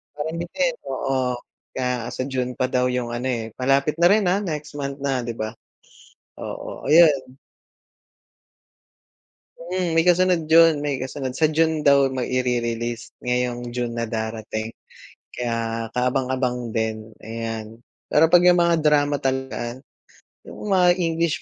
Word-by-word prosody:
Parang 155 +2 -4
bitin, 255 +9 -1 0.2
oo, 130 -2 -1 0.4
kaya 125 -2 -2
sa - - -3
June 130 -2 -2
pa 130 - +2
daw 125 0 +1
yung 125 -1 -2
ano, 125 +2 -3
eh, 115 -2 -2
malapit 135 +3 +1
na 170 +1 +5
rin, 210 -2 +3
ah? 185 +3 +2
Next 150 -5 -5
month 140 -1 -4
na, 135 -3 -1
'di 120 0 -4
ba? 110 +1 -4 0.8
Oo, - - -7
ayun. 145 -4 +5 2.3
Mm, 175 +1 -2
may 165 - +4
kasunod 180 -1 +4
yun 165 -1 +6
may 145 -1 -1
kasunod 130 0 -4
sa 155 +2 +3
June 160 -1 +1
daw 140 -1 +5
maire-release, 120 -2 -2
ngayong 125 -1 -1
June 120 -1 -2
na 115 0 -2
darating. 110 0 -4 0.6
Kaya, 115 -1 -3
kaabang-abang 125 -1 0
din, 110 -1 -3
ayan. 115 0 -6 0.2
Pero 160 +2 +4
'pag 175 +1 +6
yung 180 0 +6
mga 170 -1 +3
drama 145 -1 +3
talaga, 130 -2 -3 0.6
yung 210 - -8
mga 180 -2 +5
English 165 -1 0
130 Hz, 135 wpm, -23 LUFS, 120-160 Hz, 2.3 s, yun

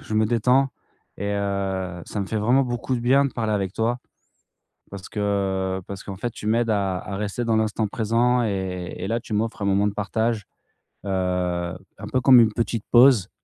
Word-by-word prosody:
je 110 - -5
me 110 0 +3
détends 125 +4 +3 0.5
et 100 +1 -2
heu, 95 -3 -2
ça 105 - -4
me 95 - -3
fait 110 - -3
vraiment 120 +6 +3
beaucoup 120 +1 -2
de 120 - -2
bien 135 +4 +4
de 140 - -2
parler 110 -2 -1
avec 95 -2 -1
toi. 120 +2 0 0.9
Parce 95 -2 -8
que, 95 -2 -1
parce 100 -1 -7
qu'en 95 -2 -7
fait 120 +3 -3
tu 105 - -7
m'aides 115 +1 +2
à 100 -3 0
à 100 - -6
rester 105 +3 -3
dans 115 -1 +2
l'instant 110 0 0
présent 120 +3 +1
et 95 -4 -3
et - - -4
là 115 +2 0
tu 110 - -8
m'offres 110 0 -1
un - - 0
moment 100 +1 +2
de 100 - -2
partage, 110 +1 -1 0.6
heu, - - -4
un 90 0 -3
peu 130 - +2
comme 130 -1 +8
une 110 - +3
petite 115 -2 -2
pause. 120 -5 +6
105 Hz, 200 wpm, -23 LUFS, 95-115 Hz, 0.9 s, comme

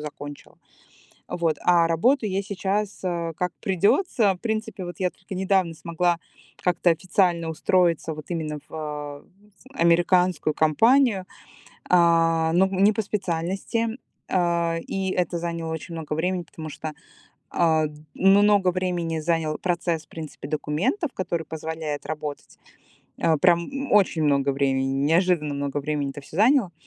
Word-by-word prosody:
закончила. 145 -1 -9 0.7
Вот, 165 -3 0
а 170 -2 +4
работаю 220 - +2
я 195 +1 0
сейчас, 200 +1 -2
а, 170 -2 -2
как 180 -1 -1
придется. 200 - +2
В - - -19
принципе, 220 -4 -3
вот 175 -1 -7
я 185 -1 +1
только 190 +1 -10
недавно 190 -2 +1
смогла 170 +2 0 0.4
как-то 180 0 +2
официально 170 0 +1
устроиться 165 0 +1
вот 155 0 -9
именно 155 -3 -3
в, - - -20
а, 150 -2 -6 0.5
американскую 175 - +3
компанию, 220 - +3 0.6
а, 165 -2 +4
но 185 +3 +4
не 195 +2 +3
по 220 - 0
специальности. 195 +3 -2 0.4
А, 170 -2 +1
и 190 -1 -2
это 175 -2 -1
заняло 165 -1 -3
очень 160 +2 -7
много 160 -2 -5
времени, 180 +3 -1
потому 160 -1 -9
что, 155 +1 -6 0.6
а, 160 -2 +2
м 150 - -9 0.2
много 200 0 +5
времени 175 -3 -2
занял 160 -1 -1
процесс, 170 -3 -1
в - - -51
принципе, 155 -3 -8
документов, 155 - -1
который 170 -3 -2
позволяет 160 -2 -5
работать. 150 -2 -6 0.6
А, 160 -2 +3
прям 180 - +1
очень 190 -6 +3
много 140 -1 +2
времени. 135 -1 +1 0.2
Неожиданно 165 -2 +2
много 140 0 -2
времени 145 -1 -2
это 140 +1 -8
всё 145 - -12
заняло. 225 -2 +4
170 Hz, 140 wpm, -24 LUFS, 155-190 Hz, 0.7 s, много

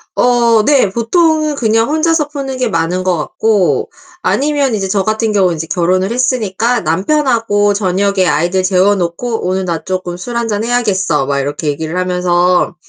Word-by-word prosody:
어. 235 -3 +3
네. 270 -5 +3
보통은 310 - +1
그냥 225 -2 +1
혼자서 315 0 +1
푸는 275 -3 -5
게 255 - 0
많은 175 -1 -1
것 185 -2 0
같고 200 +5 0 0.3
아니면 285 -4 0
이제 195 -2 -2
저 195 0 0
같은 215 +2 -1
경우는 185 -4 +2
이제 160 0 -5
결혼을 185 +3 0
했으니까 240 -2 0
남편하고 205 - +1
저녁에 195 -1 0
아이들 175 +4 +1
재워 190 +1 +3
놓고 195 +5 -3
"오늘 185 +1 -1
나 170 -2 -3
쪼끔 185 -2 -4
술 235 +7 -7
1 235 -1 -1
잔 210 -1 -2
해야겠어." 195 - 0
막 140 0 -1
이렇게 145 +3 -4
얘기를 160 +4 -3
하면서 180 -1 +1
200 Hz, 340 characters per minute, -14 LUFS, 180-240 Hz, 0.3 s, 어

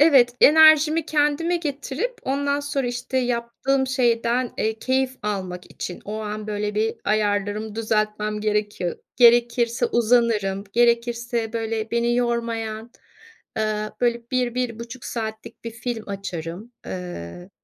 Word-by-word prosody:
evet, 265 -6 +6
enerjimi 315 +1 +7
kendime 300 +3 +1
getirip 300 - -3
ondan 280 +1 0
sonra 280 -2 -2
işte 245 +2 -2
yaptığım 250 +2 0
şeyden, 240 -1 +1
eee, 220 0 0
keyif 260 0 0
almak 185 -4 -4
için 175 - -6
o 210 +1 -4
an 215 0 -5
böyle 210 0 -2
bir 220 +1 +1
ayarlarımı 210 0 0
düzeltmem 215 -1 -1
gerekiyor. 210 -4 -1 0.2
Gerekirse 235 0 +4
uzanırım, 225 -4 +2
gerekirse, 235 0 +1
böyle, 225 -1 -2
beni 235 0 +1
yormayan, 230 -2 -2 0.7
ııı, 215 0 -1
böyle, 235 -1 +1
1-1,5 245 -1 -2
saatlik 220 -1 -6
bir 230 - -4
film 230 -1 -5
açarım. 195 +2 -6
Iıı, 175 - -7
235 Hz, 115 wpm, -23 LUFS, 215-250 Hz, 0.7 s, enerjimi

